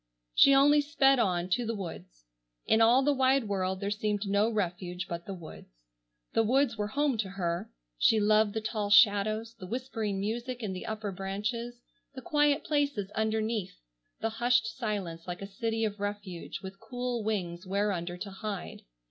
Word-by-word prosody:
She 275 - +7
only 290 +2 +6
sped 275 -3 +3
on, 180 -5 +1
to 245 +6 +1
the 230 0 -2
woods. - - -8 0.4
In 220 - +3
all 240 +4 +6
the 290 +1 +3
wide 265 0 +3
world 190 -2 -1
there 200 +1 -2
seemed 210 -1 -1
no 200 +3 +2
refuge 180 -4 -2
but 170 0 -6
the 195 - -4
woods. 170 - -11 0.6
The - - +4
woods 250 +2 +2
were 210 -1 -2
home 275 +1 0
to 200 -3 -1
her. 175 -3 -3 0.3
She 220 - +5
loved 215 0 +3
the 220 - -1
tall 215 -2 -2
shadows, 215 +1 +4
the 220 -5 -10
whispering 225 -3 -3
music 235 +4 -3
in 200 -3 -2
the 185 - -6
upper 215 -2 -3
branches, 210 +6 -4 0.3
the 260 - -7
quiet 295 +1 +2
places 285 -10 0
underneath, 220 - -1 0.4
the 225 - 0
hushed 240 +1 +2
silence 195 -9 -4
like 180 +2 -5
a 195 0 -10
city 225 -1 +1
of 210 -1 -4
refuge 205 -4 -5
with 190 +1 -8
cool 245 -1 -3
wings 185 -4 -3
whereunder 185 -3 -1
to 200 +2 -6
hide. 200 -1 -6
215 Hz, 175 wpm, -30 LUFS, 195-235 Hz, 0.6 s, She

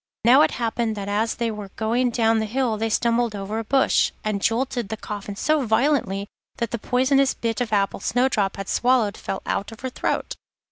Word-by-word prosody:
Now 255 +5 +7
it - - +5
happened 230 -2 -1
that 200 -1 -5
as 215 +3 0
they 235 -1 -1
were 210 -2 -7
going 235 +3 +1
down 225 -1 +2
the 220 - -1
hill 245 0 0
they 225 +1 -1
stumbled 235 0 +1
over 205 +2 -4
a - - -3
bush, 265 +4 +2
and 210 -2 -1
jolted 240 -1 0
the 220 - -4
coffin 205 -1 -6
so 305 +6 +1
violently 220 -4 +1 0.3
that 235 -2 -2
the 235 - -2
poisonous 260 +3 +2
bit 230 -1 -2
of 235 -3 -2
apple 200 -2 +1
Snowdrop 220 -4 +1
had 195 0 -5
swallowed 245 -5 +2
fell 195 - -5
out 200 - -2
of 225 - -12
her 260 0 -4
throat. - - -2
225 Hz, 200 wpm, -23 LUFS, 210-245 Hz, 0.3 s, Now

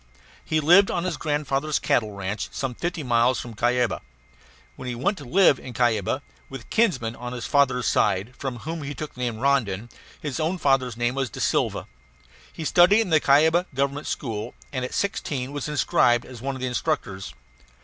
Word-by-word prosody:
He 155 - 0
lived 175 +6 +6
on 175 - -1
his 180 -3 -2
grandfather's 150 -1 -1
cattle 110 -3 +1
ranch, 100 +1 -4
some 135 -2 -3
fifty 170 +4 -3
miles 120 0 +2
from 120 - -7
Cuyaba. 120 +2 +1 0.7
Then 130 - -8
he 125 - -3
went 140 - 0
to 145 - -9
live 145 +1 +4
in 125 - -9
Cuyaba 115 -4 +1 0.3
with 135 -2 -7
a - - -20
kinsman 145 - +1
on 125 +1 -6
his 120 -2 -5
father's 130 -4 +2
side, 100 +7 +1
from 135 -2 -4
whom 160 +7 -5
he 145 0 -5
took 150 +3 -6
the - - -15
name 120 -2 -1
of 110 - -8
Rondon; 120 -6 +1 0.3
his 145 -4 -4
own 165 +4 0
father's 135 -6 +1
name 120 +1 0
was 135 -2 -1
DaSilva. - - -1 0.7
He 160 - -7
studied 180 +7 +5
in 200 -6 -3
the 155 - +6
Cuyaba 160 +6 +4
Government 140 +2 -1
School, 115 -3 -4 0.2
and 130 -2 -2
at 125 - -4
sixteen 150 - -2
was 145 0 -4
inscribed 120 -4 +2
as 125 -3 -11
one 135 +1 -3
of 130 - -8
the 130 - -1
instructors. 100 - -3
135 Hz, 190 wpm, -24 LUFS, 120-155 Hz, 0.7 s, lived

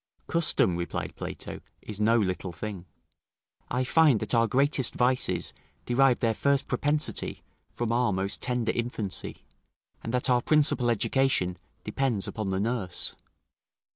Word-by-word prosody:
"Custom," 160 - +3
replied 85 0 -4
Plato, - - -7 0.2
"is 105 -1 -6
no 115 +2 +4
little 95 -3 -1
thing." 95 0 -7 0.8
I 125 - 0
find 145 -2 +4
that - - -2
our 115 -1 +4
greatest 135 +1 +1
vices 125 - +1 0.3
derive 130 0 +3
their 115 -1 +2
first 140 +4 +1
propensity 150 +1 -1 0.3
from 120 -1 -3
our 120 -1 +2
most 95 +1 -2
tender 120 -2 0
infancy, 115 -5 -4 0.6
and 115 - -4
that 125 +1 +2
our 125 -2 +3
principal 145 -4 +3
education 115 -5 +1 0.3
depends 110 -2 -1
upon 110 -3 -4
the 95 0 -1
nurse. 105 -4 -2
120 Hz, 135 wpm, -27 LUFS, 105-130 Hz, 0.8 s, no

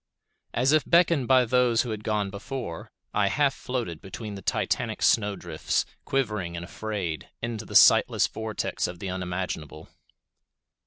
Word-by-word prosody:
As 130 +4 +3
if 155 -1 +4
beckoned 170 -6 +3
by 130 -1 +5
those 120 -1 +3
who 120 - -4
had 105 -1 -5
gone 105 -2 -1
before, 100 -3 -6 0.2
I 105 -1 +2
half 140 +7 +2
floated 120 -14 -4
between 105 +2 -7
the 100 - -7
titanic - - -1
snowdrifts, 100 -7 +1 0.2
quivering 105 -10 -1
and 85 +1 -5
afraid, 95 -6 -4
into 115 -2 -4
the - - -9
sightless - - +6
vortex 110 -1 -3
of 90 - -7
the 95 +1 -5
unimaginable. 90 -4 -5
105 Hz, 145 wpm, -26 LUFS, 90-125 Hz, 0.2 s, sightless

